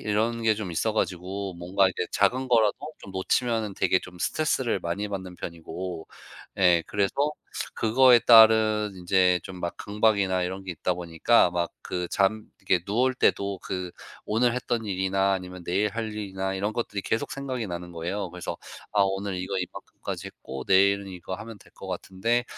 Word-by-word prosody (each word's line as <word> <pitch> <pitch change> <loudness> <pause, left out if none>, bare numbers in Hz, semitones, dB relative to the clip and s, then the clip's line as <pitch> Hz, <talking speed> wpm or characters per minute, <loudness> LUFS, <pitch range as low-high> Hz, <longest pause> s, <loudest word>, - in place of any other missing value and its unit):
이런 115 +2 0
게 110 -1 +4
좀 105 -4 -5
있어 110 +7 0
가지고 95 -1 -2
뭔가 90 +3 +2
이게 95 - -2
작은 130 +1 +2
거라도 110 -4 +4 0.2
좀 95 - -11
놓치면은 110 +2 0
되게 90 - +2
좀 90 -1 -12
스트레스를 130 - 0
많이 100 +5 -3
받는 95 -3 -6
편이고 85 0 -6 0.5
예 90 -3 +5
그래서 100 -2 0 0.6
그거에 120 +2 +6
따른 110 -2 +6
인제 90 0 +3
좀 90 -1 -8
막 85 - -3
강박이나 100 -3 +1
이런 95 +2 -4
게 90 - -4
있다 90 +3 -1
보니까 85 +4 +3
막 85 -1 -2
그 90 -1 -3
잠 105 +2 +1 0.2
이렇게 90 -1 +1
누울 125 +5 +2
때도 100 -6 +1
그 90 -1 -4 0.4
오늘 120 +3 +2
했던 120 -2 -2
일이나 95 0 +1
아니면 90 -2 -5
내일 100 +4 +1
할 110 -1 -4
일이나 95 -2 -3
이런 105 +3 -2
것들이 105 -4 -2
계속 115 - -2
생각이 130 -5 -4
나는 85 0 -6
거예요. 90 +4 -3
그래서 90 -1 -6 0.3
'아 105 - +3
오늘 95 0 -2
이거 95 +1 -3
이만큼까지 90 - -6
했고 65 0 -8
내일은 100 +1 +4
이거 95 0 -6
하면 110 +2 -8
될 - - -20
것 95 - -10
같은데 95 +6 -1
95 Hz, 350 characters per minute, -26 LUFS, 90-110 Hz, 0.6 s, 그거에